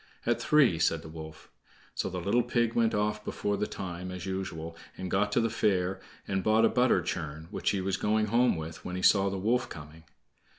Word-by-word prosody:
"At - - +1
three," 135 - +4
said 80 0 +1
the 80 - -9
wolf. 80 0 -10 0.4
So - - -2
the 90 - -4
little 100 +7 +2
pig 120 -1 0
went 115 -2 +2
off 105 0 0
before 105 -1 -2
the 105 +1 -1
time, 90 -1 -6
as 90 -1 -6
usual, 85 -4 -4 0.2
and 95 -1 -5
got 105 +2 +1
to - - +4
the 115 - +2
fair, 95 -4 +1 0.3
and 95 -1 -1
bought 110 +1 +4
a - - +4
butter 125 -8 +3
churn, 80 -2 -4
which - - -1
he 100 - 0
was 95 +1 -1
going 110 +2 +1
home 120 +4 +3
with 80 0 -7
when 90 - -5
he 95 - -4
saw 100 -1 +5
the 95 - -3
wolf 115 +6 +1
coming. 80 +1 -11
95 Hz, 215 wpm, -29 LUFS, 85-110 Hz, 0.4 s, saw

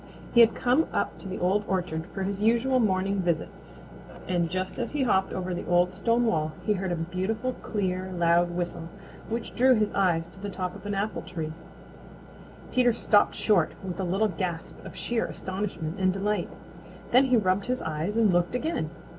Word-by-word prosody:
He 235 - +5
had 230 -1 +7
come 255 +6 +2
up - - -2
to - - -8
the 190 - -4
Old 190 +4 +1
Orchard 175 -3 -2
for 195 - -5
his 195 +1 -3
usual 235 +4 +3
morning 195 -2 +1
visit 175 -3 0 0.8
and 175 -2 +1
just 185 +2 -3
as 240 - -1
he 290 -2 -1
hopped 190 -6 +2
over 185 -1 -3
the 175 - -5
old 175 +1 +3
stone 230 +5 +1
wall 155 -7 0
he 210 - +3
heard 190 -2 -2
a - - +1
beautiful 190 +9 -2
clear, 185 -3 -2
loud 175 0 +3
whistle 175 -1 -4 0.4
which 230 +1 -3
drew 255 +1 +5
his 215 -2 +1
eyes 175 -4 +2
to 190 - -15
the 205 - -4
top 185 -2 -4
of 205 - -9
an 205 - -2
apple 205 +2 -2
tree. 160 -3 -5 1.2
Peter 245 -2 +4
stopped 215 -2 +3
short 190 -7 +2
with 185 0 -5
a - - 0
little 195 +5 +1
gasp 180 -4 -4
of - - -9
sheer 235 -1 -1
astonishment 185 -3 -4
and 185 -1 +3
delight. 195 -1 -1 0.6
Then 255 +3 +6
he 255 -2 +4
rubbed 190 0 +1
his 255 0 -1
eyes 160 +7 -2
and 215 -5 +4
looked 175 +6 +1
again. 295 - -1
190 Hz, 190 wpm, -27 LUFS, 175-220 Hz, 1.2 s, had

